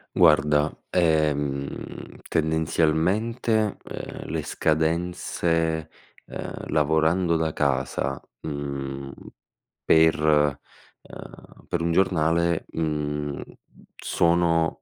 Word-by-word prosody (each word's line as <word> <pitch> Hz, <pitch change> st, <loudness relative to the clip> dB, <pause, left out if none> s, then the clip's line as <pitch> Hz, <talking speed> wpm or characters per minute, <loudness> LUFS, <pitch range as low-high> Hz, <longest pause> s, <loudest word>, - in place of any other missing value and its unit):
Guarda, 75 Hz, -3 st, +4 dB
ehm, 75 Hz, -5 st, +1 dB, 0.6 s
tendenzialmente, 90 Hz, +8 st, +1 dB
uhm, -, -, -8 dB
le 80 Hz, -1 st, -2 dB
scadenze, 80 Hz, 0 st, 0 dB, 0.4 s
uhm, -, -, -7 dB, 0.2 s
lavorando 80 Hz, +3 st, +2 dB
da 80 Hz, -1 st, -1 dB
casa, 65 Hz, -3 st, -1 dB, 0.2 s
mhmm, 70 Hz, -2 st, -5 dB, 0.8 s
per 80 Hz, 0 st, +5 dB, 0.8 s
uhm, -, -, -13 dB
per 85 Hz, -2 st, -1 dB
un 85 Hz, -, 0 dB
giornale, 85 Hz, -2 st, +2 dB
mhmm, 75 Hz, -2 st, -2 dB, 0.5 s
sono 85 Hz, -1 st, +1 dB
80 Hz, 75 wpm, -25 LUFS, 75-85 Hz, 0.8 s, per